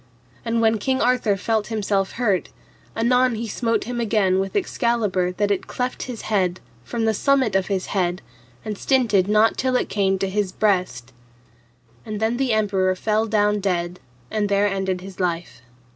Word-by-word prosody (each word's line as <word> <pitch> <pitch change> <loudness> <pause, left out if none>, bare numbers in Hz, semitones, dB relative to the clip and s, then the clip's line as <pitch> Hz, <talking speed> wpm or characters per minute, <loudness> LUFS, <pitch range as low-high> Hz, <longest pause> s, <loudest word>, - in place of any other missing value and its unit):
And 230 0 0
when 220 -1 +3
King 260 +5 0
Arthur 240 -4 +2
felt 215 +1 -1
himself 205 -3 -1
hurt, 210 -6 0 0.5
anon 250 +2 +3
he 230 +1 -4
smote 230 +1 -1
him 245 0 -4
again 200 -4 +2
with 195 0 -3
Excalibur 230 - 0
that 205 +2 0
it 200 - -1
cleft 250 0 -3
his 245 -3 -6
head, 185 -4 0 0.2
from 230 - -2
the 220 - +2
summit 260 -2 +2
of 190 -1 +1
his 195 -2 -1
head, 180 -5 0 0.4
and 210 -2 -4
stinted 225 -8 +2
not 215 +2 +3
till 255 -1 +1
it - - 0
came 195 -2 +1
to 195 - -1
his 195 0 -1
breast. 180 - 0 0.9
And 215 -1 -5
then 220 +2 0
the 265 -2 0
emperor 195 -4 +1
fell 215 +3 0
down 210 -1 +2
dead 180 -2 -2 0.3
and 210 -1 0
there 200 +1 +3
ended 190 -2 -2
his 190 0 -11
life. 175 -7 -2
210 Hz, 175 wpm, -22 LUFS, 190-230 Hz, 0.9 s, when